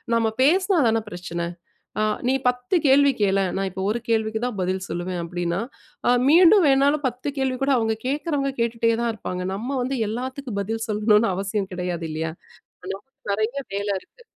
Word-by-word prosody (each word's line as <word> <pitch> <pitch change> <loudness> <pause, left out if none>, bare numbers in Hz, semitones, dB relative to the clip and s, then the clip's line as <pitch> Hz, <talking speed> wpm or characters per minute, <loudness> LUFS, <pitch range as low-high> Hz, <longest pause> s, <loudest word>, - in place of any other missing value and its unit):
நம்ம 225 -1 +2
பேசினா 370 +5 +3
தான 225 0 +1
பிரச்சன? 170 -1 -4 0.5
அ - - +3 0.2
நீ 260 - +3
10 250 +5 0
கேள்வி 280 +1 +6
கேளேன்! 195 -2 +2
நான் 195 0 -1
இப்ப 190 +1 -5
ஒரு 225 +3 0
கேள்விக்கு 220 -1 +1
தான் 245 -4 -3
பதில் 185 +1 -1
சொல்வேன், 175 +1 -3
அப்பிடின்னா, 175 +1 -2 0.5
அ - - +6 0.2
மீண்டும் 355 +4 +7
வேணாலும் 280 +2 +3
10 250 +2 -5
கேள்விகூட 265 +1 0
அவுங்க 225 -1 +1
கேட்கிறவங்க 285 0 -1
கேட்டுட்டே 230 0 +1
தான் 235 -1 +1
இருப்பாங்க. 180 -4 -5
நம்ம 245 +8 -3
வந்து 265 +2 -2
எல்லாத்துக்கும் 255 -1 -4
பதில் 225 +3 -3
சொல்லணுன்னு 210 0 +3
அவசியம் 195 0 -2
கிடையாது 180 -2 -3
இல்லயா! 160 +1 -3 0.5
ஹலோ! 195 +1 -4 0.3
நிறைய 220 +6 -1 0.2
வேல 200 +1 -2
இருக்கு. 485 - -21
225 Hz, 165 wpm, -23 LUFS, 195-270 Hz, 0.5 s, மீண்டும்